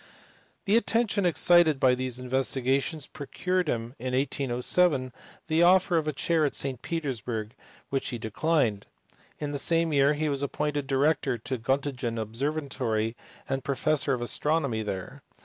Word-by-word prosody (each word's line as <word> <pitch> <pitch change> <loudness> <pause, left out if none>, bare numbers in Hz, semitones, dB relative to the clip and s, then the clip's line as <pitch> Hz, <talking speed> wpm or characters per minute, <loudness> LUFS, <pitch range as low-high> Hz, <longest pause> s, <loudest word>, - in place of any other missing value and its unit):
The 205 +3 +4
attention 220 -4 +1
excited 170 -3 +4
by 130 -1 +5
these 125 -1 -3
investigations 130 +3 -1
procured 180 +5 -2
for - - +2
him 115 +2 -6
in 125 +1 -2
1807 130 +1 +1 0.3
the 160 +1 +1
offer 180 +1 +5
of 155 -1 0
a - - +1
chair 160 +2 +1
at 145 - 0
St 130 -3 -2
Petersburg, 120 -8 -3 0.4
which 135 -1 -1
he 120 - -4
declined. 115 -1 0 0.5
In 150 -1 -4
the 140 - -1
same 165 +1 +2
year 140 +1 +4
he 155 +1 -1
was 140 -2 -1
appointed 145 0 -2
director 135 -1 +1
of 115 - -12
the 130 -3 -3
Gottingen 130 -2 -1
observatory 115 -1 -2 0.3
and 135 -1 -2
professor 140 +1 0
of 120 -2 -2
astronomy 140 -1 0
there. 95 -4 -5
140 Hz, 150 wpm, -27 LUFS, 125-155 Hz, 0.5 s, by